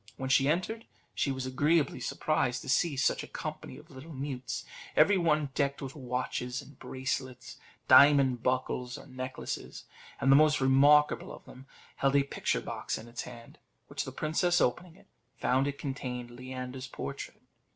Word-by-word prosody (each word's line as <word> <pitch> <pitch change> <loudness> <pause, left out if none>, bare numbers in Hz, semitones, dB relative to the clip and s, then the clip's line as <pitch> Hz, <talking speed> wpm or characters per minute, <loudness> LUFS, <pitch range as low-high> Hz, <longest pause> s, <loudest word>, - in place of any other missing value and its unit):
When 130 0 -4
she 135 0 +4
entered 185 +8 -1
it, - - -22 0.3
she 140 - 0
was 130 -1 -3
agreeably 145 +4 +1
surprised 130 -5 -1
to - - -8
see 145 +1 +2
such 130 - +2
a - - -8
company - - -7
of - - -15
little 145 +5 -10
mutes, 135 -1 -4 0.3
every 205 - +6
one 150 -4 +1
decked 140 -1 0
with 135 -1 -7
watches, 125 -1 -3
bracelets, 130 -1 -5 0.3
diamond 140 -4 +7
buckles, 125 -1 -1
or - - -12
necklaces; 130 0 -6 0.3
and 135 - +3
the - - +8
most 150 +1 +5
remarkable 140 +3 +4
of - - -11
them 130 +1 -13 0.3
held 135 0 +2
a 140 - +5
picture 140 - -1
box - - -4
in 115 - -10
its 120 0 -6
hand, 120 -2 -11 0.3
which - - -3
the - - -7
princess 175 +3 +1
opening, 180 +9 -1 0.3
found 130 +2 +2
it 140 0 -3
contained 125 -3 -5
Leander's 130 +1 -7
portrait. - - -7
135 Hz, 160 wpm, -30 LUFS, 130-150 Hz, 0.3 s, the